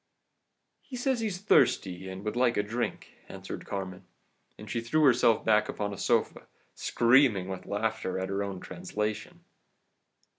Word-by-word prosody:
"'He 265 Hz, -, -10 dB
says 250 Hz, 0 st, 0 dB
he's 215 Hz, -5 st, -2 dB
thirsty, 95 Hz, -, +2 dB
and 95 Hz, +2 st, -8 dB
would 105 Hz, -, -2 dB
like 120 Hz, -1 st, +2 dB
a 105 Hz, -, +2 dB
drink,' 115 Hz, +4 st, -4 dB
answered -, -, -8 dB
Carmen, 95 Hz, -1 st, -6 dB, 0.5 s
and -, -, -11 dB
she 115 Hz, -, -2 dB
threw 155 Hz, +7 st, +1 dB
herself 120 Hz, -4 st, +4 dB
back 105 Hz, -1 st, +3 dB
upon 100 Hz, -1 st, -3 dB
a -, -, -7 dB
sofa, -, -, 0 dB, 0.3 s
screaming 120 Hz, -6 st, +3 dB
with 95 Hz, -1 st, -6 dB
laughter 110 Hz, -2 st, -2 dB
at 95 Hz, 0 st, -3 dB
her 100 Hz, +1 st, -1 dB
own 100 Hz, -2 st, -5 dB
translation. 105 Hz, -, -4 dB
105 Hz, 150 wpm, -29 LUFS, 95-125 Hz, 0.5 s, herself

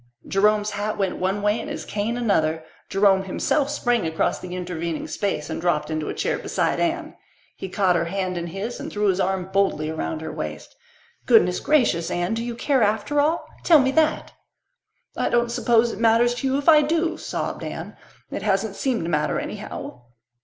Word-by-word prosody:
Jerome's 210 Hz, +1 st, +2 dB
hat 205 Hz, +1 st, -3 dB
went 195 Hz, -2 st, -1 dB
one 195 Hz, +2 st, -1 dB
way 210 Hz, +2 st, +2 dB
and -, -, -7 dB
his -, -, -5 dB
cane 215 Hz, +3 st, -2 dB
another. 160 Hz, -9 st, +1 dB, 0.3 s
Jerome 195 Hz, -1 st, +3 dB
himself 275 Hz, +9 st, 0 dB
sprang 240 Hz, -4 st, +1 dB
across 160 Hz, 0 st, 0 dB
the 180 Hz, 0 st, -7 dB
intervening 170 Hz, -3 st, -4 dB
space 175 Hz, -7 st, -2 dB
and -, -, -4 dB
dropped 155 Hz, -3 st, 0 dB
into 155 Hz, -1 st, -2 dB
the -, -, -4 dB
chair -, -, -1 dB
beside -, -, -1 dB
Anne. 335 Hz, -2 st, -1 dB, 0.4 s
He 190 Hz, -, -6 dB
caught 185 Hz, -1 st, +2 dB
her 170 Hz, 0 st, +1 dB
hand 185 Hz, +1 st, -2 dB
in 170 Hz, 0 st, -3 dB
his 195 Hz, +7 st, -5 dB
and -, -, -6 dB
threw 210 Hz, -1 st, +1 dB
his 190 Hz, 0 st, +1 dB
arm 190 Hz, -1 st, -1 dB
boldly 190 Hz, -6 st, +1 dB
around 160 Hz, 0 st, -3 dB
her 160 Hz, -, -5 dB
waist. -, -, -6 dB, 0.5 s
"Goodness 215 Hz, -7 st, +5 dB
gracious, 230 Hz, -, +2 dB
Anne! 175 Hz, +4 st, -1 dB
Do 230 Hz, +1 st, -2 dB
you 240 Hz, -1 st, -4 dB
care 265 Hz, +2 st, +1 dB
after 220 Hz, +7 st, +1 dB
all? 315 Hz, +4 st, 0 dB, 0.2 s
Tell 330 Hz, -, +7 dB
me 265 Hz, -2 st, +3 dB
that!" 315 Hz, +2 st, +1 dB, 0.8 s
"I -, -, 0 dB
don't 240 Hz, 0 st, +1 dB
suppose 235 Hz, -1 st, +3 dB
it -, -, -7 dB
matters 230 Hz, +1 st, +4 dB
to 245 Hz, +2 st, -2 dB
you 265 Hz, +1 st, +1 dB
if 285 Hz, -, -4 dB
I 310 Hz, -2 st, +8 dB
do," 325 Hz, +2 st, 0 dB
sobbed -, -, -4 dB
Anne. -, -, -6 dB, 0.4 s
"It -, -, -4 dB
hasn't -, -, 0 dB
seemed 255 Hz, -8 st, 0 dB
to 165 Hz, -, -3 dB
matter, 150 Hz, 0 st, +1 dB
anyhow." 125 Hz, -, -7 dB
205 Hz, 195 wpm, -23 LUFS, 180-245 Hz, 0.8 s, I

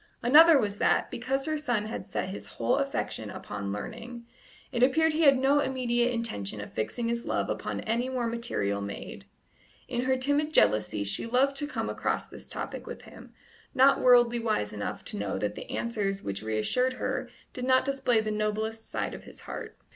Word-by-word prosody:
Another 310 Hz, +6 st, +8 dB
was 205 Hz, -5 st, -1 dB
that, -, -, +2 dB
because 270 Hz, +3 st, -2 dB
her 310 Hz, -1 st, -1 dB
son 240 Hz, -8 st, 0 dB
had 220 Hz, -, -6 dB
set 185 Hz, -, -3 dB
his 195 Hz, -, -7 dB
whole 115 Hz, 0 st, +2 dB
affection -, -, -2 dB
upon 100 Hz, -1 st, -5 dB
learning, 235 Hz, -, -7 dB, 0.5 s
it 240 Hz, -3 st, -2 dB
appeared 315 Hz, +5 st, +4 dB
he 315 Hz, -, 0 dB
had 275 Hz, -2 st, +7 dB
no 275 Hz, +3 st, +3 dB
immediate 245 Hz, -3 st, +1 dB
intention 110 Hz, -, -3 dB
of 105 Hz, -, -8 dB
fixing 230 Hz, -, -2 dB
his 235 Hz, 0 st, -2 dB
love -, -, 0 dB
upon -, -, -3 dB
any 235 Hz, +3 st, -1 dB
more 255 Hz, -2 st, -1 dB
material 165 Hz, -, -1 dB
maid. 100 Hz, 0 st, -7 dB, 0.6 s
In 245 Hz, +1 st, -2 dB
her 260 Hz, 0 st, +2 dB
timid 285 Hz, +4 st, 0 dB
jealousy 105 Hz, 0 st, +3 dB
she 100 Hz, -, +2 dB
loved 265 Hz, +4 st, +2 dB
to 290 Hz, -, -1 dB
come 295 Hz, -, -3 dB
across -, -, -1 dB
this -, -, -11 dB
topic -, -, -5 dB
with -, -, -8 dB
him, -, -, -14 dB, 0.4 s
not 270 Hz, +2 st, +5 dB
worldly 240 Hz, -1 st, +5 dB
wise 215 Hz, -, -1 dB
enough 105 Hz, -1 st, -5 dB
to -, -, -5 dB
know 100 Hz, -2 st, -2 dB
that 105 Hz, +1 st, -2 dB
the -, -, -9 dB
answers 200 Hz, -4 st, -2 dB
which 100 Hz, 0 st, -3 dB
reassured 110 Hz, -, 0 dB
her 255 Hz, -, -3 dB, 0.2 s
did 250 Hz, -, -4 dB
not 260 Hz, 0 st, +4 dB
display 270 Hz, -4 st, +2 dB
the 215 Hz, 0 st, -3 dB
noblest 215 Hz, +1 st, -2 dB
side -, -, -2 dB
of -, -, -9 dB
his -, -, -12 dB
heart. -, -, -7 dB
235 Hz, 190 wpm, -28 LUFS, 190-260 Hz, 0.6 s, Another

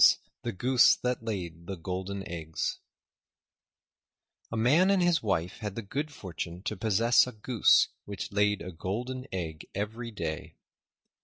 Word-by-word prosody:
THE -, -, -2 dB
GOOSE 125 Hz, +6 st, +5 dB
THAT 125 Hz, -2 st, -2 dB
LAID 85 Hz, -6 st, -4 dB
THE 95 Hz, -, -3 dB
GOLDEN 95 Hz, +3 st, -4 dB
EGGS 80 Hz, -2 st, -3 dB, 1.7 s
A 115 Hz, -, -2 dB
Man 150 Hz, +12 st, +5 dB
and 200 Hz, -1 st, +4 dB
his 175 Hz, -3 st, +3 dB
Wife 90 Hz, -4 st, -1 dB
had 105 Hz, -3 st, -4 dB
the 115 Hz, -, -4 dB
good 145 Hz, +9 st, -3 dB
fortune 90 Hz, -, -6 dB
to 110 Hz, -, -2 dB
possess 115 Hz, +4 st, +4 dB
a -, -, -5 dB
Goose 110 Hz, +1 st, +4 dB, 0.2 s
which 100 Hz, -1 st, -5 dB
laid 105 Hz, 0 st, +2 dB
a 90 Hz, -, -6 dB
Golden 125 Hz, +10 st, -4 dB
Egg 80 Hz, -4 st, -4 dB
every 110 Hz, +4 st, -3 dB
day. 80 Hz, -8 st, -5 dB
105 Hz, 145 wpm, -29 LUFS, 90-120 Hz, 1.7 s, GOOSE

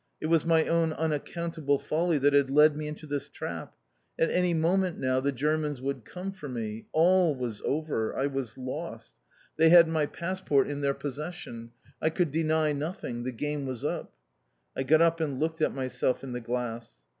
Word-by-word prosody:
It -, -, -4 dB
was 165 Hz, 0 st, +2 dB
my 165 Hz, -1 st, +4 dB
own 165 Hz, -1 st, +2 dB
unaccountable 160 Hz, -1 st, -1 dB
folly 165 Hz, +3 st, 0 dB
that 145 Hz, +1 st, +3 dB
had 140 Hz, -2 st, +4 dB
led 150 Hz, +2 st, +6 dB
me 150 Hz, 0 st, -4 dB
into 150 Hz, +1 st, -7 dB
this 145 Hz, -1 st, -3 dB
trap. -, -, -6 dB, 0.4 s
At 165 Hz, -, +2 dB
any 180 Hz, 0 st, +2 dB
moment 175 Hz, +2 st, +1 dB
now 130 Hz, 0 st, +1 dB
the 140 Hz, +2 st, 0 dB
Germans 150 Hz, +1 st, -1 dB
would 135 Hz, -3 st, -4 dB
come 185 Hz, +2 st, -6 dB
for 170 Hz, -7 st, -9 dB
me. 115 Hz, -3 st, -5 dB
All 175 Hz, -1 st, +4 dB
was 120 Hz, -5 st, -4 dB
over. 145 Hz, -7 st, -1 dB
I 135 Hz, -, +1 dB
was 135 Hz, -4 st, -3 dB
lost. 130 Hz, 0 st, -6 dB, 0.4 s
They 160 Hz, -, +6 dB
had 170 Hz, 0 st, +9 dB
my 160 Hz, -2 st, +1 dB
passport 170 Hz, -6 st, 0 dB
in 145 Hz, 0 st, -4 dB
their 140 Hz, -1 st, +1 dB
possession. 145 Hz, -5 st, -6 dB, 0.3 s
I 160 Hz, -, +3 dB
could 170 Hz, -1 st, 0 dB
deny 155 Hz, 0 st, +1 dB
nothing. 140 Hz, -5 st, -4 dB
The 130 Hz, -, -1 dB
game 145 Hz, +3 st, -3 dB
was 130 Hz, -3 st, -4 dB
up. -, -, -3 dB, 0.6 s
I -, -, -1 dB
got 155 Hz, +5 st, +5 dB
up 165 Hz, 0 st, +3 dB
and 140 Hz, -5 st, -2 dB
looked 160 Hz, 0 st, -1 dB
at -, -, +3 dB
myself 130 Hz, -1 st, -1 dB
in 135 Hz, -, -6 dB
the 125 Hz, 0 st, -4 dB
glass. 120 Hz, -1 st, -4 dB
150 Hz, 190 wpm, -28 LUFS, 130-165 Hz, 0.6 s, had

